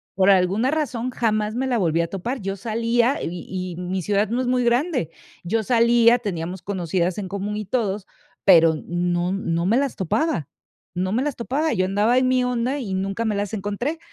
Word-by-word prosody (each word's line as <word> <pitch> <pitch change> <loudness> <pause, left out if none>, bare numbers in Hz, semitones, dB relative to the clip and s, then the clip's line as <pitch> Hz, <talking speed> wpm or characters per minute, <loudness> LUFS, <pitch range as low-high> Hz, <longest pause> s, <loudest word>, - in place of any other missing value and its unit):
Por 190 +1 +4
alguna 195 +6 +3
razón 255 -6 -2
jamás 215 -3 0
me 260 +2 -1
la 245 - +1
volví 170 -4 +1
a 170 - -2
topar, 235 +7 -4
yo 195 0 -3
salía 230 - +1
y 175 +1 -5
y 185 -1 -4
mi 185 +1 -2
ciudad 205 +2 +1
no 245 +2 0
es 255 - -2
muy 250 0 +2
grande, 245 - +1 0.3
yo 220 +6 0
salía, 235 +1 +4
teníamos 180 -4 -4
conocidas 180 -2 -1
en 200 - -4
común 200 +2 -4
y 210 - -4
todos, 205 -3 -1 0.4
pero 165 -4 +7
n 155 - -7
no 175 +1 0
no 170 -3 -1
me 220 +5 +3
las 275 -1 0
topaba 190 - -1 0.5
no 185 +1 -1
me 245 - +1
las 295 -3 -2
topaba, 280 +7 -1
yo 185 0 +1
andaba 210 +6 +2
en 255 - +3
mi 255 0 +2
onda 250 +3 -1
y 200 -7 -4
nunca 195 +4 -2
me 215 -2 0
las 205 0 -3
encontré. 215 - -3
210 Hz, 205 wpm, -23 LUFS, 185-245 Hz, 0.5 s, pero